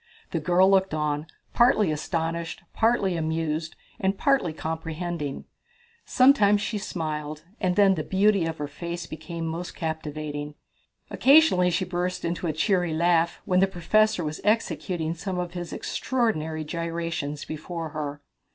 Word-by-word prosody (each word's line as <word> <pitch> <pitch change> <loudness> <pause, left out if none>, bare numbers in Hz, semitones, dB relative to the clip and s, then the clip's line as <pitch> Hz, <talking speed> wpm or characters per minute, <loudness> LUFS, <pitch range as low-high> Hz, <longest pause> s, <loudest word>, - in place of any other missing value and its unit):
The 165 - 0
girl 180 +4 +4
looked 190 -3 +3
on, 150 0 -1 0.3
partly 215 -7 +4
astonished, 165 +2 -3
partly 220 -5 +2
amused, 160 -1 -2 0.2
and 195 -2 0
partly 275 - +2
comprehending. 160 -1 -4 0.6
Sometimes 255 -6 +5
she 210 0 -2
smiled, 155 -5 -4 0.2
and 180 -2 +1
then 200 -1 +5
the 165 - -2
beauty 195 0 +3
of 165 0 -4
her 145 - -3
face 170 +3 -6
became 165 +1 -6
most 165 +2 -4
captivating. 150 -2 -4 0.6
Occasionally 275 - +5
she 185 +2 0
burst 180 0 -2
into 170 +1 -2
a - - +1
cheery 175 0 +1
laugh 170 0 +2
when 180 0 +2
the 195 - +5
professor 195 +2 +2
was 155 0 -4
executing 185 -6 0
some 180 +2 -4
of 175 -1 -3
his 175 -1 -5
extraordinary 160 -12 -1
gyrations 165 -2 -3
before 160 +1 -5
her. 145 -1 -5
170 Hz, 140 wpm, -26 LUFS, 155-190 Hz, 0.6 s, Sometimes